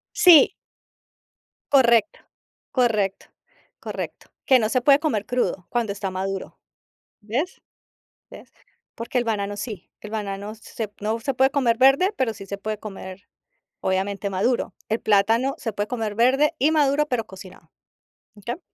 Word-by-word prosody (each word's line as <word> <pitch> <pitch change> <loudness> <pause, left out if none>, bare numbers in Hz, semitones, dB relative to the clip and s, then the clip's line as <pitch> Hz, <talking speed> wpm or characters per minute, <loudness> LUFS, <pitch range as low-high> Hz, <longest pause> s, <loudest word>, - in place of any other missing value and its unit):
Sí. 345 -5 +7 1.2
Correcto, 245 +1 +4 0.5
correcto, 215 -6 +1 0.5
correcto. - - -7 0.2
Que 260 -1 +6
no 215 -2 0
se 255 - +2
puede 275 +2 +5
comer 220 -10 -1
crudo 245 -7 -1
cuando 230 -4 -1
está 200 -1 -4
maduro, 190 +1 -5 0.6
¿ves? 250 - -3 0.7
¿Ves? - - -13 0.4
Porque 235 +2 -3
el 240 - 0
banano 205 -2 -2
sí, 205 -4 -7
el 210 - -9
banano 205 0 -4
se 220 0 -6
no 220 +2 -1
se 270 +2 -2
puede 265 +1 +3
comer 250 -5 +1
verde, 275 +10 +5
pero 245 -4 0
sí 195 -2 -11
se 200 0 -6
puede 215 +1 -4
comer 195 -2 -9 0.6
obviamente, 195 +2 -1
maduro. 205 +6 0 0.2
El 220 +1 -1
plátano 225 +6 +2
se 225 -4 -4
puede 205 +1 -2
comer 220 -4 -3
verde 265 +6 +3
y 295 +5 +3
maduro, 295 -1 +3
pero 245 -5 -2
cocinado, 185 0 -13 0.7
mm, 205 - -16
¿qué? 240 +10 -4
225 Hz, 145 wpm, -23 LUFS, 200-260 Hz, 1.2 s, Sí